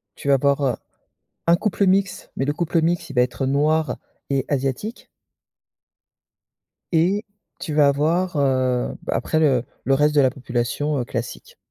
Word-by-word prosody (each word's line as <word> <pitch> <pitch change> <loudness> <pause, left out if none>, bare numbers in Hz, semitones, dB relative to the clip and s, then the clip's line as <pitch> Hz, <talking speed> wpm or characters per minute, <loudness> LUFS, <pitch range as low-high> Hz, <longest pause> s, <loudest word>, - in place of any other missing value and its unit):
Tu - - -9
vas 140 - +6
avoir, 140 +1 +1
heu, 125 -3 +1 0.7
un 170 - +6
couple 200 +1 0
mixte, 190 +1 0
mais 135 - -1
le 145 - 0
couple 170 +1 0
mixte 170 +1 0
il - - -7
va 125 - +5
être 125 +2 -1
noir 150 +3 +1 0.3
et 135 -2 0
asiatique 140 - -3 1.8
et 185 +6 +2 0.4
tu 155 - -4
vas 145 -1 +5
avoir, 160 +5 +1
heu, 130 -3 +1
bah, - - -3
après, 160 - 0
le 135 -6 +3 0.2
le 135 - +3
reste 150 +2 +2
de 145 - +5
la 130 -2 +4
population, 130 +3 -2
heu, 125 - -1
classique. 115 0 -6
145 Hz, 165 wpm, -22 LUFS, 130-165 Hz, 1.8 s, vas